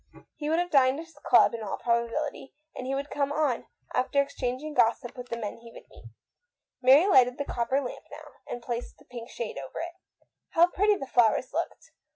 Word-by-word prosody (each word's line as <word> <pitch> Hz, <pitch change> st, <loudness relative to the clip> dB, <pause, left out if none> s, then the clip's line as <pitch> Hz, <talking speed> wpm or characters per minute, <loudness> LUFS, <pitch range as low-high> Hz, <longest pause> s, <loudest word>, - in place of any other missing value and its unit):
He 295 Hz, -1 st, -4 dB
would 320 Hz, -, +2 dB
have 350 Hz, 0 st, -1 dB
dined 270 Hz, 0 st, +4 dB
at 330 Hz, -, -7 dB
his 330 Hz, -, -20 dB
club -, -, +6 dB
in 230 Hz, -, -5 dB
all 210 Hz, -, -4 dB
probability, 240 Hz, +5 st, -2 dB, 0.2 s
and 255 Hz, -, -6 dB
he 270 Hz, -, -1 dB
would 280 Hz, +1 st, -4 dB
come 280 Hz, -1 st, 0 dB
on 290 Hz, -5 st, 0 dB, 0.3 s
after 280 Hz, +2 st, +1 dB
exchanging 280 Hz, +1 st, -2 dB
gossip 240 Hz, 0 st, +2 dB
with 250 Hz, -1 st, -9 dB
the 235 Hz, -, -3 dB
men 215 Hz, -1 st, -5 dB
he 230 Hz, 0 st, -13 dB
would -, -, -14 dB
meet. -, -, -16 dB, 0.8 s
Mary 270 Hz, +6 st, +7 dB
lighted 255 Hz, -10 st, +5 dB
the 285 Hz, -, -3 dB
copper 245 Hz, +2 st, 0 dB
lamp 260 Hz, -3 st, -6 dB
now, -, -, -11 dB, 0.2 s
and 240 Hz, -, -6 dB
placed 240 Hz, 0 st, -5 dB
the -, -, -21 dB
pink 240 Hz, -1 st, -9 dB
shade 225 Hz, -10 st, -5 dB
over 135 Hz, -1 st, -9 dB
it. 340 Hz, +1 st, -5 dB, 0.6 s
How 335 Hz, +1 st, +7 dB
pretty 415 Hz, +2 st, +3 dB
the 275 Hz, -, -5 dB
flowers 245 Hz, +1 st, +2 dB
looked! 335 Hz, +3 st, -4 dB
260 Hz, 205 wpm, -28 LUFS, 235-295 Hz, 0.8 s, Mary